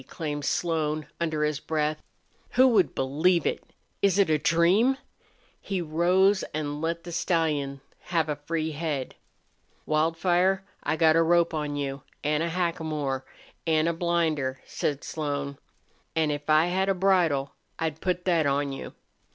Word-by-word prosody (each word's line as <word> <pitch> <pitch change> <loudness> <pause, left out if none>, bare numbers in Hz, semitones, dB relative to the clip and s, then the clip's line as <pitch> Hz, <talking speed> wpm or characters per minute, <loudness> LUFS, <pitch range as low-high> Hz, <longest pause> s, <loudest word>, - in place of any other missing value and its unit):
exclaimed 145 +1 -5
Slone, 155 -1 0
under 160 -3 0
his 150 -1 0
breath. 155 0 -1 0.5
"Who 260 +1 +6
would 210 -6 +3
believe 160 +7 +2
it! - - -1 0.4
Is 200 -1 +3
it 195 -5 +3
a 155 - +3
dream?" 180 - +3 0.6
He 195 -2 -2
rose 180 +5 +3
and 145 -1 -3
let 165 +1 -2
the 175 - -8
stallion 155 -5 0 0.2
have 165 -3 -1
a 150 - -1
free 160 +2 -3
head. 150 -4 -3 0.7
"Wildfire, 175 +5 +2 0.2
I 155 - 0
got 160 -1 +4
a 165 - +5
rope 170 0 +3
on 150 -2 -2
you 140 -1 -3 0.2
an' 150 +1 +1
a 170 - 0
hackamore 155 -6 -2 0.4
an' 160 0 +3
a 170 - +1
blinder," 160 -6 0
said 145 -2 -2
Slone. 140 -3 -3 0.6
"An' 160 -2 +2
if 145 +1 -5
I 155 +1 +5
had 190 +2 0
a 195 - +2
bridle 175 -8 +2 0.2
I'd 160 -1 -3
put 180 -1 -1
that 170 -5 +3
on 140 0 0
you. 135 - -7
160 Hz, 150 wpm, -27 LUFS, 150-175 Hz, 0.7 s, Who